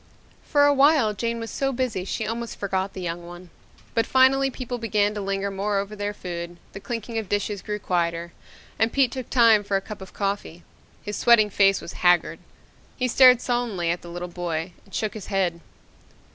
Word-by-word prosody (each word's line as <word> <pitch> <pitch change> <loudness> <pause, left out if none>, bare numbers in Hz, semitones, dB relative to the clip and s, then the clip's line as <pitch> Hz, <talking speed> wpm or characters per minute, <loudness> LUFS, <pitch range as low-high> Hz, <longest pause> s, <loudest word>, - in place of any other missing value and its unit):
For 285 -2 +3
a 290 - +5
while 275 -5 +4
Jane 230 +3 -2
was 225 0 -6
so 270 0 -1
busy 240 -8 -2
she 220 - -3
almost 230 +2 -4
forgot 195 -1 -2
the 185 - -6
young 170 0 -4
one. 175 0 -11 0.4
But 230 -1 +1
finally 270 +1 +4
people 250 -2 -5
began 210 -2 +1
to 210 - -4
linger 195 0 -2
more 200 +1 -1
over 200 +2 -3
their 205 0 -3
food, 175 -3 -6 0.2
the 195 - -7
clinking 230 +1 -4
of 210 -4 -7
dishes 205 -1 -1
grew 210 0 -4
quieter 170 -3 -2 0.5
and 225 +1 +2
Pete 270 -3 +2
took 260 -3 -6
time 230 -4 +5
for 200 -1 0
a - - 0
cup 205 +1 -9
of 190 - -10
coffee. 195 -4 -3 0.4
His 210 0 -4
sweating 225 -3 +5
face 195 0 +3
was - - -8
haggard. 175 -1 +3 0.6
He 255 - 0
stared 250 0 +6
sullenly 230 -9 -1
at 175 - -3
the 175 - -10
little 175 +1 -5
boy 175 -1 -4
and 195 - -11
shook 215 -1 -1
his 215 -3 -8
head. 185 -4 0
205 Hz, 200 wpm, -24 LUFS, 185-235 Hz, 0.6 s, stared